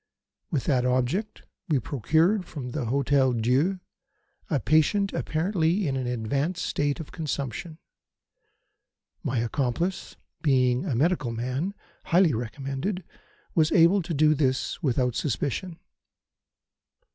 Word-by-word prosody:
With 145 -7 -1
that 130 -4 +2
object, 130 - 0 0.3
we 150 - +3
procured 160 - +1
from 130 -6 -6
the 130 -1 -3
Hotel 135 +1 +2
Dieu 130 +11 +1 0.7
a 150 -6 +1
patient 160 - +2
apparently 170 +2 0
in 135 - -1
an 130 -2 -2
advanced 140 +9 -1
state 145 +2 -1
of 160 - -8
consumption. 155 +1 -4 1.4
My 135 -5 -2
accomplice, 140 +10 -2 0.3
being 130 -2 +2
a 145 -9 -1
medical 145 -1 +1
man, 130 - -3 0.3
highly 170 -3 +4
recommended, 135 - -3 0.5
was 155 -1 +3
able 180 +3 +5
to 170 0 -4
do 155 +1 +5
this 130 -3 0
without 125 -4 +1
suspicion. 145 +8 -2
145 Hz, 115 wpm, -26 LUFS, 125-170 Hz, 1.4 s, able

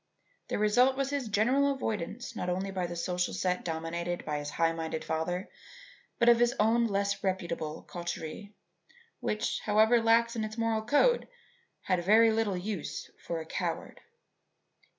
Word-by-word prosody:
The - - -2
result 245 +6 +4
was 275 0 -1
his 280 -4 -2
general 255 +7 +3
avoidance 225 -2 -4
not 180 - -3
only 190 +2 -2
by 185 -2 -2
the 175 - -6
social 180 +1 -1
set 180 -1 -1
dominated 170 +1 -3
by 150 -1 -2
his 145 0 -5
high 165 +1 +1
minded 160 -1 -4
father, 175 +4 -2 0.7
but - - +3
by 240 - +10
his 240 +2 +2
own 230 +2 +3
less 200 -1 -1
reputable 170 -5 -2
coterie, 175 +3 -6 0.7
which, 215 - -1
however 220 +3 +4
lax 230 +1 +3
in 225 - -1
its 215 +1 -5
moral 225 -1 +1
code, 295 - +3 0.6
had 185 -2 0
very 220 +4 +6
little 220 -4 0
use 190 -2 -5
for 165 -1 -4
a - - -8
coward. - - -4
200 Hz, 155 wpm, -30 LUFS, 175-230 Hz, 0.7 s, by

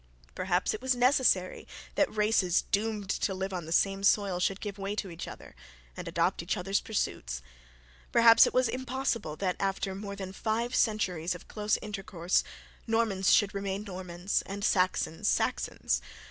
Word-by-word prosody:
Perhaps 180 0 0
it 215 - -5
was 260 0 +1
necessary 245 -7 +2 0.3
that 295 - +2
races 210 -4 +2
doomed 210 -1 0
to 195 0 -1
live 190 +1 -3
on 175 -3 -4
the - - -7
same 195 +3 +2
soil 200 -2 +3
should 190 +2 0
give 205 -1 -6
way 195 +1 -3
to 195 -3 -4
each 165 - -7
other, - - -11 0.4
and - - -7
adopt - - 0
each - - -2
other's 195 +2 0
pursuits. 60 - -3 0.7
Perhaps 230 -1 +7
it - - -1
was 255 -1 +4
impossible 250 - -2
that 180 +2 -1
after 195 0 -1
more 200 +1 -6
than 190 -1 -6
five 230 +4 -1
centuries 180 -7 +1
of 180 - -12
close 210 0 0
intercourse, 190 -4 -1 0.4
Normans 220 -4 +2
should 205 -2 +4
remain 200 0 -3
Normans, 185 -1 -2
and 200 +1 -3
Saxons, 185 -3 +1
Saxons. - - 0
195 Hz, 160 wpm, -29 LUFS, 185-220 Hz, 0.7 s, Perhaps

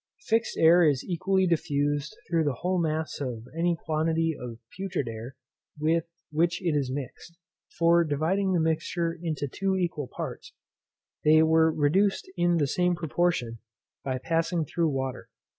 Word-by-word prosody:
Fixed 225 0 0
air 170 +2 +6
is 145 -5 +2
equally 190 +2 +1
diffused 145 +1 0
through 165 -2 +1
the 145 -4 0
whole 180 0 +1
mass 160 -1 -2
of 120 -5 -4
any 170 0 +1
quantity 160 +1 +1
of 120 -4 -7 0.2
putrid 190 -8 -3
air 115 +3 -7 0.4
with 160 +2 +1 0.3
which 170 +2 +1
it 170 -5 0
is 135 -3 0
mixed: 145 +5 -7 0.4
for 170 0 +5
dividing 170 +6 0
the 175 - +2
mixture 165 +1 0
into 155 -4 -2
two 190 +7 -1
equal 170 -6 -2
parts, - - -7 0.7
they 155 +1 +6
were 160 0 +4
reduced 180 +7 +1
in 175 -1 +2
the 150 - +2
same 180 +5 +1
proportion 160 -8 -1 0.4
by 130 -1 -2
passing 165 +3 0
through 165 +2 0
water. 130 -4 -4
160 Hz, 150 wpm, -27 LUFS, 145-175 Hz, 0.7 s, air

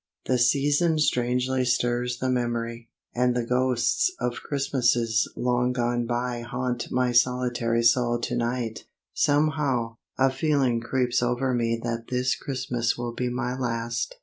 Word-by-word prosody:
The 125 -1 +1
season 145 +6 +3
strangely 125 -2 +1
stirs 120 0 0
the 130 +1 -1
memory, 120 -1 -2 0.2
and 125 0 +1
the 120 -1 -1
ghosts 125 - +1
of 120 -1 -2
Christmases 120 -5 +1
long 125 +1 +1
gone 120 -1 0
by 120 0 -2
haunt 125 0 -3
my 125 -1 +1
solitary 120 -1 +1
soul 120 0 +3
to 120 +1 -2
night. 120 -2 -2 0.3
Somehow, 145 -6 +1 0.2
a 135 0 +3
feeling 135 -4 +1
creeps 125 0 0
over 125 +2 0
me 115 -1 0
that 115 -1 -3
this 125 0 0
Christmas 125 -4 -2
will 120 -1 -4
be 125 +1 -2
my 125 0 -2
last. 120 - -2
125 Hz, 140 wpm, -26 LUFS, 120-130 Hz, 0.3 s, season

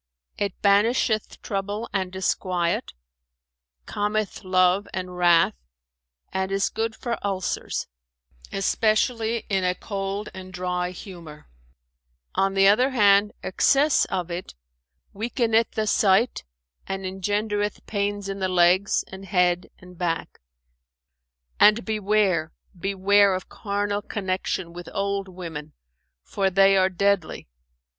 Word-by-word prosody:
"It 200 -2 -3
banisheth 215 +2 +2
trouble 205 +3 -3
and 190 -2 -1
disquiet, 180 -2 -1 0.9
calmeth 210 0 -2
love 185 +1 +3
and 180 -1 -5
wrath 175 -2 +4 0.8
and 190 0 -1
is 195 0 +1
good 225 0 -2
for 240 -1 -4
ulcers, 195 -2 -2 0.7
especially 220 +3 +1
in 195 -2 0
a 180 0 +1
cold 200 +1 -4
and 185 0 -9
dry 180 -1 -2
humour; 170 - -11 0.8
on 195 0 +1
the 195 0 +5
other 245 +7 +5
hand 205 -4 +4
excess 280 +9 +3
of 180 -2 -3
it 175 +2 -6 0.6
weakeneth 230 +1 +1
the 220 - -1
sight 205 - +2 0.4
and 195 0 -4
engendereth 205 +2 -2
pains 205 -1 -2
in 195 0 -4
the 190 -1 0
legs 180 +2 +3
and 190 +1 -10
head 180 -2 +1
and 180 -1 -15
back: 165 -3 -2 1.2
and 215 +3 +5
beware, 205 -6 +1 0.2
beware 195 +1 +3
of 185 - -6
carnal 205 0 -2
connection 185 -3 -3
with 175 0 -9
old 200 0 -1
women, 165 -5 -8 0.5
for 195 -1 0
they 195 +1 +5
are 190 0 +4
deadly. 195 -2 0
195 Hz, 115 wpm, -24 LUFS, 185-205 Hz, 1.2 s, the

